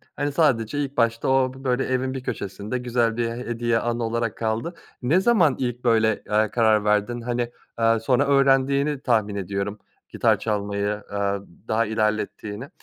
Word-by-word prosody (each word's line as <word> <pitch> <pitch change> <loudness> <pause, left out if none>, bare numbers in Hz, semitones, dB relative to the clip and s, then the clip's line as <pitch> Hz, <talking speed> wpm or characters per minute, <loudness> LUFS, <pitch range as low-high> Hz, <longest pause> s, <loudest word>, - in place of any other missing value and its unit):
hani 145 0 -1
sadece 140 -4 +1
ilk 140 0 -3
başta 115 +1 +1
o 130 -1 +2
b 135 - -13
böyle 130 0 +1
evin 130 0 -1
bir 130 -1 -5
köşesinde 105 +2 -4
güzel 120 -2 0
bir 120 -1 0
he 115 - -5
hediye, 120 -1 -1
anı 120 0 -2
olarak 115 -1 -2
kaldı. 115 +9 -2 0.3
Ne 140 +9 +3
zaman 185 - +4
ilk 125 -1 -3
böyle, 110 -2 +2
aaa, 105 0 +2
karar 110 -3 +3
verdin? 105 +3 +1
Hani, 120 0 -2 0.3
aaa, 115 0 +3
sonra 130 +5 +2
öğrendiğini 140 +1 +3
tahmin 110 -6 +1
ediyorum 100 +2 -3 0.3
gitar - - +2
çalmayı, 100 -1 -1
aaa, 100 -1 -3 0.3
daha 115 +1 +1
ilerlettiğini 110 +2 -2
115 Hz, 165 wpm, -24 LUFS, 110-130 Hz, 0.3 s, zaman